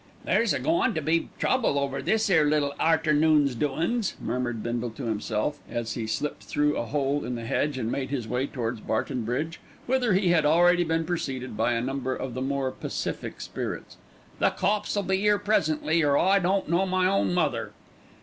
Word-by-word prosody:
"There's 230 -2 +2
a - - +1
goin' 325 - +1
to 155 - -1
be 165 +3 +1
trouble 240 - +1
over 135 -1 -1
this 220 +9 +1
'ere 160 -6 +4
little 145 -2 +1
arternoon's 155 -3 +3
doin's," 170 - -1
murmured 120 -3 -2
Bindle 120 0 -2
to 115 +5 -9
himself, 110 +5 -2
as 120 -1 -3
he 115 -2 -4
slipped 150 +6 -3
through 150 0 +1
a 120 - -2
hole 145 +1 0
in 125 - -3
the 115 -1 -6
hedge 140 +3 0
and 115 -2 -2
made 135 -2 -2
his 130 -5 -3
way 125 +4 -1
towards 120 -5 -3
Barton 120 +2 -2
Bridge, 155 +8 -2 0.3
whither 250 -4 +2
he 185 -1 +2
had 170 -3 +4
already 175 +3 +4
been 165 0 0
preceded 135 -8 -3
by 115 +3 +1
a 115 - 0
number 130 0 -2
of 130 -2 -5
the 130 - -4
more 135 0 -1
pacific - - -5
spirits. - - -5 0.4
"The - - +4
cops 210 +3 -1
'll 205 - +1
be 190 +1 0
'ere 210 0 +5
presently, 160 -5 +1
or 145 -1 +3
I 195 +2 +4
don't 190 +1 +1
know 175 +4 +2
my 185 0 +1
own 195 0 +2
mother." 145 -10 0
150 Hz, 195 wpm, -26 LUFS, 130-175 Hz, 0.4 s, ere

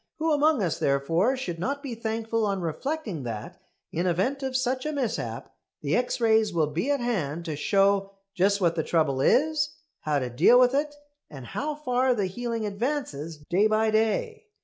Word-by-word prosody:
Who 320 +1 0
among 295 -5 +3
us 170 -4 -1
therefore 165 - +1
should 175 -10 -4
not 280 - -2
be 265 -4 -4
thankful 225 0 -2
on 200 -2 0
reflecting 200 - -3
that, 115 -4 -6 0.3
in 175 +3 -1
event 195 +11 0
of 265 -1 -1
such 255 0 -1
a 305 - -2
mishap, 275 -6 -3 0.3
the - - +1
X 250 +1 0
rays 220 -2 +3
will 165 -3 +2
be 170 - -2
at 285 -1 +2
hand 170 -9 -2
to 155 -3 -3
show 195 +4 +2 0.2
just 200 +2 +2
what 170 -3 +2
the 160 - +1
trouble 150 -6 +1
is, 300 - +2 0.2
how 150 -1 0
to 130 -3 -2
deal 240 - +6
with 250 0 +5
it, 295 +1 0 0.3
and 135 -4 -9
how 300 - -3
far 255 -3 +1
the 205 -4 0
healing 230 +3 -3
advances 200 - -3
day 195 +5 +3
by 215 0 +2
day? 220 - 0
220 Hz, 185 wpm, -26 LUFS, 170-260 Hz, 0.3 s, deal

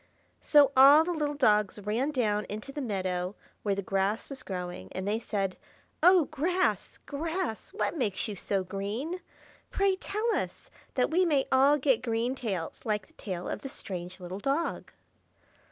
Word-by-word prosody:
So 290 -3 +5
all 280 +4 +9
the 355 - -2
little 295 -2 -1
dogs 210 -8 +3
ran 215 +7 -1
down 215 -7 0
into 215 +6 -6
the 290 - -5
meadow 185 -4 -2 0.3
where 200 -2 0
the 200 - -3
grass 195 +3 0
was 270 -2 -6
growing, 180 - -6
and 190 +1 -4
they 215 +2 +1
said, 195 -5 -2 0.4
"Oh, 360 -1 +6
grass, 350 +5 0
grass! 320 - -3
what 405 - -1
makes 235 - -1
you 210 - -4
so 195 0 -1
green? 210 - -4 0.5
Pray 395 -1 +2
tell 425 +4 -1
us, - - -4 0.2
that 255 +2 +2
we 360 +3 +4
may 295 -6 +2
all 275 +3 +5
get 260 -4 +2
green 235 +1 0
tails, 200 -11 -4
like 210 -3 -1
the - - -26
tail 180 -4 -5
of - - -4
the 270 - -6
strange 180 -6 -7
little 180 +2 -6
dog." 280 +9 -1
235 Hz, 170 wpm, -29 LUFS, 195-295 Hz, 0.5 s, all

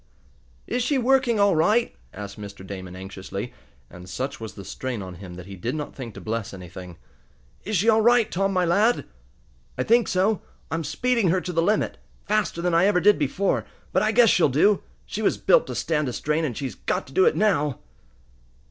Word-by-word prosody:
"Is 250 - -1
she 270 +4 +1
working 255 -3 +3
all 200 -3 +4
right?" 215 +9 +2 0.2
asked 100 +1 -8
Mr. 100 -2 -9
Damon, 95 -2 -7
anxiously, 95 +4 -7 0.3
and, 90 +6 -12
such 130 +10 -4
was 110 -1 -7
the 100 - -9
strain 125 +4 -4
on 90 -1 -8
him 90 0 -10
that 90 0 -9
he 100 +1 -9
did 115 - -3
not 150 -1 -5
think 120 -6 -8
to - - -7
bless 110 -2 -4
anything. 90 -1 -10 0.7
"Is 215 +2 -2
she 200 +7 +1
all 220 -1 +5
right, 235 -1 +4
Tom, 195 +2 0
my 185 -2 +2
lad?" 210 +8 +2 0.7
"I - - 0
think 235 +1 +3
so. 195 +3 +1 0.3
I'm 165 0 -1
speeding 230 - +1
her 185 +3 +2
to 180 - -5
the 165 - +2
limit. 210 +5 0 0.3
Faster 205 -5 0
than 175 -1 +1
I 170 +3 +5
ever 200 -3 +3
did 205 +2 +4
before, 180 +8 0 0.3
but - - +3
I 215 - +2
guess 230 -1 +6
she'll 170 - +4
do. 190 +10 +3 0.2
She - - -5
was - - +2
built - - +4
to - - -5
stand 150 -4 0
a - - -5
strain, 150 +5 0
and 120 -7 -4
she's 135 -3 -4
got - - -2
to 135 - -15
do 190 - +5
it - - +3
now!" 150 -11 +1
165 Hz, 210 wpm, -24 LUFS, -, 0.7 s, guess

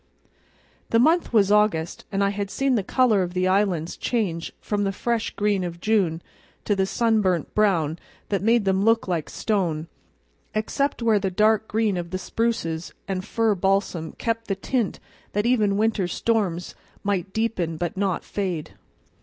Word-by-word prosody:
The 230 - +3
month 320 +8 +3
was 205 -4 +4
August, 210 -6 +2
and 195 0 +1
I 200 - +2
had 200 -1 -3
seen 270 +5 0
the 225 - +2
color 220 0 +3
of 180 0 -3
the 185 0 +2
islands 185 -4 +1
change 185 -9 -2
from 205 -1 -1
the 195 - 0
fresh 230 +3 -1
green 205 -2 +1
of 170 -1 -5
June 185 -6 +1 0.4
to 210 - +2
a 190 -1 +1
sunburnt 210 -7 +1
brown 170 -7 +2 0.3
that 200 - 0
made 225 +1 +3
them 190 0 +2
look 225 0 +3
like 170 -4 -2
stone, 170 -7 -1 0.7
except 245 +4 -1
where 220 -3 +4
the 195 -1 -1
dark 215 +3 +2
green 215 -3 +1
of 170 -1 -4
the 185 - -2
spruces 185 -6 -2
and 185 -1 -2
fir 225 +1 +1
balsam 190 -4 0
kept 230 0 -2
the 195 - 0
tint 230 +2 -1 0.3
that 210 +2 0
even 215 -5 +2
winter 215 -3 +1
storms 185 -3 -1 0.3
might 195 -2 -1
deepen, 190 -7 -1
but 175 +5 -3
not 195 -1 -1
fade. 180 -6 -3
200 Hz, 165 wpm, -24 LUFS, 180-220 Hz, 0.7 s, was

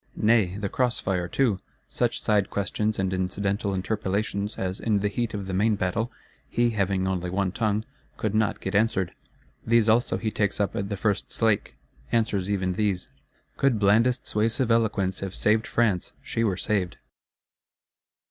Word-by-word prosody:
Nay, 105 -4 +3
the 105 -1 -2
cross 125 +4 0
fire 90 -3 -1
too: 115 -3 +1 0.3
such - - -1
side 105 -2 +2
questions 105 +2 -1
and 95 -1 0
incidental 100 +2 -1
interpellations 100 +1 -2
as, 95 0 -3
in 110 -3 +1
the 105 - +2
heat 115 +1 -2
of 100 -2 -4
the 95 - -4
main 105 +3 +3
battle, 105 +5 -1 0.4
he 120 0 +2
(having 95 -3 0
only 90 -2 -1
one 95 +1 0
tongue) 110 +1 0 0.3
could 105 -2 -1
not 110 -1 +1
get 95 - -4
answered; 100 -4 +1 0.5
these 115 -1 +3
also 115 +3 +3
he 110 - -2
takes 105 -1 0
up 100 -3 0
at 100 0 -2
the 100 - -3
first 105 0 -1
slake; 110 -3 +1 0.4
answers 105 -4 +1
even 95 -2 0
these. 100 -2 -1 0.5
Could 135 -4 +3
blandest 115 +5 +3
suasive 115 +3 +1
eloquence 100 -5 +1
have 95 -1 -5
saved 110 +1 +2
France, 105 -7 +1
she 115 - -1
were 100 -5 +1
saved. 95 -4 -1
105 Hz, 165 wpm, -26 LUFS, 95-110 Hz, 0.5 s, Nay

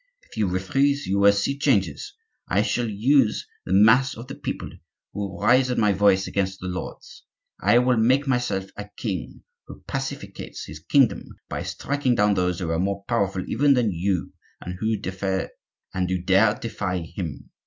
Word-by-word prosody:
If - - -17
you 110 -3 +1
refuse 135 +11 +1
you 100 +1 0
will 100 0 +7
see 100 +7 0
great 140 - -13
changes. 95 - 0 0.3
I 100 +3 +2
shall 120 +1 -1
use 115 +3 +2 0.2
the - - 0
mass 125 +8 +5
of 115 - -8
the 135 - -8
people, - - -5 0.4
who - - -6
will 100 -2 -4
rise 130 +1 +4
at 125 - -1
my 105 -2 +3
voice 95 -1 +3
against 95 -1 -2
the - - -8
lords. 90 - -7 0.4
I 120 - +4
will 125 0 +3
make 130 +6 +3
myself 120 -8 0
a 105 0 -8
king 95 -8 -5 0.2
who - - -12
pacificates - - -5
his 75 +1 -9
kingdom 135 - +2 0.2
by - - -3
striking 140 -3 -1
down 105 -1 +3
those 90 -2 0
who 85 -3 -3
are 80 - 0
more 100 +1 -2
powerful 100 -5 -1
even 145 -1 +3
than 120 -4 +2
you, 90 +1 -2 0.3
and 90 - -6
who 110 +1 0
dare 95 0 -1
defy 105 -7 -3
him. 85 -1 -6
100 Hz, 175 wpm, -24 LUFS, 95-125 Hz, 0.4 s, will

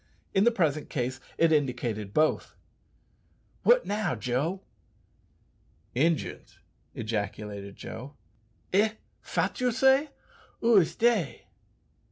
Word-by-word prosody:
In 195 +2 +4
the 240 - +6
present 155 -9 0
case 130 0 -2 0.2
it 165 -1 +4
indicated 120 -8 0
both. 155 +7 +1 1.1
"What - - +5
now, 205 -8 -1
Joe?" 130 - -2 1.3
"Injuns!" 160 +5 -1 0.4
ejaculated 105 -2 -4
Joe. 135 +5 -8 0.6
"Eh! 215 +3 +4 0.3
fat - - -2
you 250 -1 +2
say? 265 +5 +4 0.5
Ou 230 -2 +6
is 175 -5 +3
dey?" 220 - +1
155 Hz, 100 wpm, -28 LUFS, -, 1.3 s, the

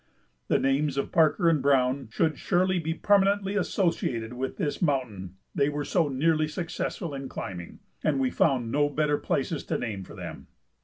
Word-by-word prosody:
The - - +3
names 135 +1 +1
of 140 - -1
Parker 165 +2 +3
and 160 -4 +3
Browne 130 -2 +2
should 155 +4 0
surely 185 0 +2
be 165 0 -2
permanently 200 0 +2
associated 165 - 0
with 130 +2 -4
this 150 -7 -2
mountain 120 - -1 0.2
they 140 - +2
were 145 0 -3
so 170 0 +2
nearly 155 +3 +2
successful 165 0 -4
in 135 -1 -5
climbing, 90 -2 -7 0.2
and 145 -3 +2
we 130 -1 +1
found 125 -6 +1
no 145 +2 +2
better 145 0 +1
places 145 +3 -1
to - - -1
name 105 -5 -4
for - - -12
them. - - -8
145 Hz, 170 wpm, -27 LUFS, 130-165 Hz, 0.2 s, The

